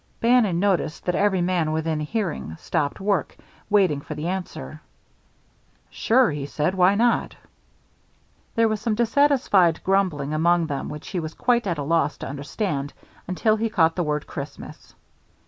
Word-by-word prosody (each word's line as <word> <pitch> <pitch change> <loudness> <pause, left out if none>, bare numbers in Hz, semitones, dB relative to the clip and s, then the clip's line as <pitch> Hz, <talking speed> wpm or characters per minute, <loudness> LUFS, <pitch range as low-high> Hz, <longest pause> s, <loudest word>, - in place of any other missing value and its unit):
Bannon 230 -7 +3
noticed 180 -5 0
that 180 - 0
every 195 -1 +2
man 175 -3 0
within 160 0 -1
hearing 155 - -3
stopped 145 - -2
work, 195 -5 -1 0.3
waiting 190 -9 +3
for - - -7
the 155 +3 -4
answer. 180 - -6 1.1
"Sure," 245 -4 +3
he 145 -1 -4
said. 150 +5 -1
"Why 190 +1 +4
not?" 235 +3 +1 1.2
There 230 0 +4
was 215 -1 -2
some 225 -1 0
dissatisfied 235 - +3
grumbling 180 -7 0
among 170 +2 +2
them 140 -3 -4
which 150 0 -8
he 185 - -2
was 160 -1 -6
quite 240 -3 +1
at 170 -4 -1
a 145 - -3
loss 160 0 +1
to - - -6
understand 145 +1 -3 0.3
until 215 +4 +1
he 225 +1 -1
caught 165 -7 +2
the 180 - -1
word 150 -3 -1
"Christmas." - - -9
180 Hz, 155 wpm, -23 LUFS, 155-210 Hz, 1.2 s, Why